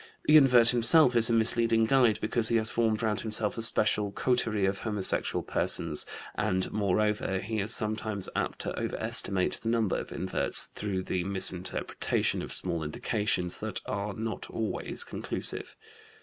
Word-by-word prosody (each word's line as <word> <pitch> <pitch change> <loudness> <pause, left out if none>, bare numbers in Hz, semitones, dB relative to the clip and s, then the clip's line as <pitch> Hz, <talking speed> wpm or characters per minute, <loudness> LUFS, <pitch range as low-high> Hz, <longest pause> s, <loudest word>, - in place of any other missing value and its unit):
The 150 - +4
invert 125 -5 +6
himself 125 +3 +5
is 115 0 +5
a - - +1
misleading 115 0 +3
guide 120 -3 +3
because 110 +1 +1
he 115 - 0
has 110 -1 +3
formed 110 -2 0
round 110 -1 -1
himself 105 -1 0
a 115 - -5
special 105 -2 +2
coterie 115 -3 0
of 95 0 -1
homosexual 105 -4 +1
persons, - - 0 0.3
and, 95 -3 -1
moreover, 105 -1 -1
he 110 +3 -4
is 105 +2 -2
sometimes 110 -3 -3
apt - - -2
to - - -4
overestimate 95 -2 -1
the 115 - -3
number 115 -4 0
of - - -7
inverts 95 0 0
through 95 -3 -4
the 90 -1 -3
misinterpretation 95 -2 -1
of - - -8
small 85 -1 -1
indications 90 +3 -3
that - - -2
are 100 +1 -4
not 110 0 -5
always 115 - -3
conclusive. - - -3
110 Hz, 155 wpm, -28 LUFS, 100-115 Hz, 0.3 s, invert